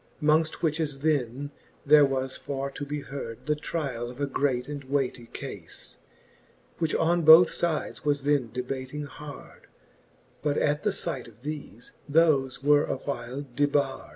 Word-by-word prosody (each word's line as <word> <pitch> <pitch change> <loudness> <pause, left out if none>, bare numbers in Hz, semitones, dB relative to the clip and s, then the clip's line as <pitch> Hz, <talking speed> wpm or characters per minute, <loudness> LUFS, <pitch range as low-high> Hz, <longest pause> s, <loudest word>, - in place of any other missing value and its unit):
Mongft 155 +2 +2
which 160 0 +1
as 145 -3 -2
then, 145 -2 0 0.3
there 150 0 +7
was 130 -1 -2
for 140 0 -4
to 145 - -6
be 145 0 -3
heard 135 -5 -7
The 150 - +2
try 150 -3 -3
all 120 +1 -4
of 125 +2 -11
a 145 - +1
great 135 -2 0
and 145 -1 -6
weigh 135 -1 +1
tie 120 -2 -14
cafe, - - -7 1.1
Which 160 -2 0
on 170 +1 +2
both 160 +2 +8
fides 165 -3 -1
was 145 -2 +1
then 140 -4 +2
debating 130 +4 -4
hard: 145 0 -11 0.7
But 145 0 0
at 150 0 +1
the 210 - +1
fight 150 -10 -3
of 115 0 -17
thefe, 145 -5 -7 0.2
thofe 140 -5 +3
were 145 +1 +5
a - - -2
while 140 0 -5
debard. 140 -2 +1
145 Hz, 165 wpm, -27 LUFS, 135-150 Hz, 1.1 s, both